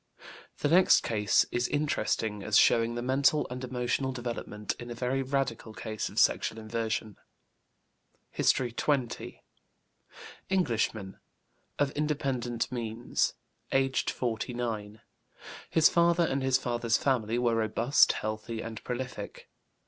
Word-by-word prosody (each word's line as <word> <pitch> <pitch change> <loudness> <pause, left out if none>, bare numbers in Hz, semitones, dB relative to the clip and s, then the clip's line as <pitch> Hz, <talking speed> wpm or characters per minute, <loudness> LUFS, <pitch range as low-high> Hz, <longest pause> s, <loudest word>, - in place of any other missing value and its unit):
The - - +2
next 180 +5 +6
case 105 -3 +2
is 120 0 0
interesting 115 -8 -1
as 105 +1 +2
showing 115 0 +4
the 120 - -3
mental 135 +4 +3
and 125 +1 -5
emotional 130 +1 -1
development 120 -4 -4
in 120 - -8
a 120 - -5
very 125 +3 -1
radical 130 -5 -2
case 110 -2 -4
of - - -13
sexual 110 - +2
inversion. 110 -1 -3 1.1
HISTORY 125 -2 +2
XX. 130 -1 -2 1.1
Englishman, 115 - -1 0.6
of 145 -1 +1
independent 135 -6 -2
means, 120 -1 -1 0.4
aged 135 0 +1
49. 115 -3 -3 0.7
His 160 -1 +5
father 170 0 +3
and 135 -3 -1
his 130 -1 +3
father's 120 -3 0
family 120 -4 0
were 120 -1 +2
robust, 115 +4 +3
healthy, 110 +1 -4
and 110 -1 -7
prolific. 125 +1 -6
120 Hz, 120 wpm, -29 LUFS, 110-135 Hz, 1.1 s, next